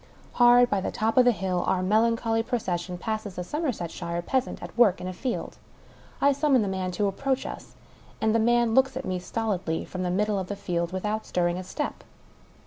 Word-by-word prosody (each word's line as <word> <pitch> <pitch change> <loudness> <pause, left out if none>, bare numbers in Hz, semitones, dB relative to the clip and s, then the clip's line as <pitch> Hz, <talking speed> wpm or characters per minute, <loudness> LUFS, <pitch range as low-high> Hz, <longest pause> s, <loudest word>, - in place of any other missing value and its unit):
Hard 245 0 +6
by 200 -4 0
the - - -2
top 220 +1 -1
of 255 - +6
the 245 - +6
hill, 185 -5 -1
our 185 -1 +1
melancholy 225 +3 +2
procession 185 -7 -3
passes 215 0 -4
a 180 - -2
Somersetshire 175 - -3
peasant 260 +6 -1
at - - -9
work 225 -6 +4
in 180 - -5
a 185 - -4
field. 245 +6 -4 0.6
I 280 - +4
summon 275 -4 +3
the - - -2
man 190 -1 -2
to 205 +3 0
approach 265 +7 -1
us; - - -8 0.4
and 220 0 +2
the 230 - +3
man 235 0 +3
looks 265 +1 +3
at 265 - -5
me 185 -1 -2
stolidly, 185 -4 -2
from 185 - -6
the 180 - -1
middle 205 +2 +1
of 185 - -4
the 205 - -4
field, 170 -3 -2
without 210 +4 -3
stirring 175 0 0
a - - -5
step. 240 +11 -4
210 Hz, 205 wpm, -26 LUFS, 185-240 Hz, 0.6 s, Hard